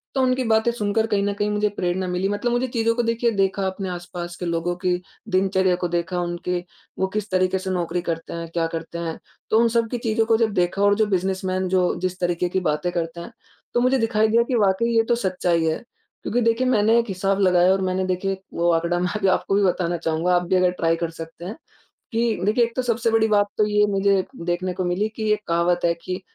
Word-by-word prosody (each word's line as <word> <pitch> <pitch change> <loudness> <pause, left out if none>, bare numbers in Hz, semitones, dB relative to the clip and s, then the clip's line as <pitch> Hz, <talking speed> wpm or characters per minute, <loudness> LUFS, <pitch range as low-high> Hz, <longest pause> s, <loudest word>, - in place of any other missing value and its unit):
तो, 265 - +2
उनकी 255 0 +2
बातें 220 +1 +3
सुनकर 220 -1 0
कहीं 205 -2 +1
न 205 0 0
कहीं 205 +1 -1
मुझे 210 0 +1
प्रेरणा 180 +1 -1
मिली 180 +2 -1
मतलब 205 +4 -1
मुझे 245 +2 +1
चीज़ों 230 -2 +1
को 240 - +1
देखिए 230 +1 +1
देखा 195 -1 0
अपने 190 0 -4
आस-पास 175 -1 -6
के 180 - -4
लोगों 170 +1 -1
की 180 -1 +2 0.4
दिनचर्या 190 -1 +2
को 175 0 -2
देखा, 175 +1 -2
उनके 175 +1 -2 0.4
वो 190 - +2
किस 210 0 -2
तरीके 185 0 +1
से 190 0 -5
नौकरी 175 -1 -1
करते 165 -1 -4
हैं, 170 0 -5
क्या 165 0 -1
करते 165 +1 -6
हैं? 165 -1 -4 0.3
तो 220 - +4
उन 235 - +4
सब 230 0 +1
की 245 - -1
चीज़ों 225 -1 0
को 225 0 +3
जब 225 -1 +1
देखा 180 +1 0
और 205 0 +5
जो 220 +1 +2
बिजनेसमैन 190 -1 -1
जो 185 0 +3 0.2
जिस 185 0 -2
तरीके 175 0 0
की 190 - 0
बातें 150 +4 -1
करते 170 -1 -3
हैं, 170 - -9 0.4
तो - - +2
मुझे 255 +2 +3
दिखाई 220 -2 +2
दिया 230 +2 +3
कि 245 +1 -2
वाक़ई 205 +3 +2
ये 225 - +5
तो 240 - +4
सच्चाई 180 -6 0
है। 160 0 +1 0.5
क्योंकि 245 +3 0
देखिए 230 +2 +2
मैंने 225 -2 +4
एक 230 - 0
हिसाब 195 +1 0
लगाया 180 -1 +4
और 190 - 0
मैंने 185 0 0
देखिए 185 +1 -1 0.2
वो 170 0 +2
आँकड़ा 170 +1 0
मैं 180 0 0
अभी 200 -2 0
आपको 190 +1 +1
भी 205 - +3
बताना 175 -2 +1
चाहूँगा, 165 +2 0
आप 175 - +2
भी 185 - +2
अगर 180 -1 +3
ट्राई 165 0 +2
कर 165 0 -3
सकते 165 +1 -9
हैं, 205 +5 -5 0.6
कि 230 -1 +1
देखिए 215 +4 +3
एक 230 0 -5
तो 255 - +1
सबसे 235 -1 0
बड़ी 225 0 +3
बात 205 -1 +3
तो 215 - +4
ये 210 0 +3
मुझे 195 -1 +2 0.2
देखने 175 +1 -1
को 185 0 -2
मिली 180 +4 0
कि 215 -1 -1
एक 210 - 0
कहावत 170 +1 +2
है 170 0 +3
कि 185 +1 -4
190 Hz, 240 wpm, -23 LUFS, 175-220 Hz, 0.6 s, और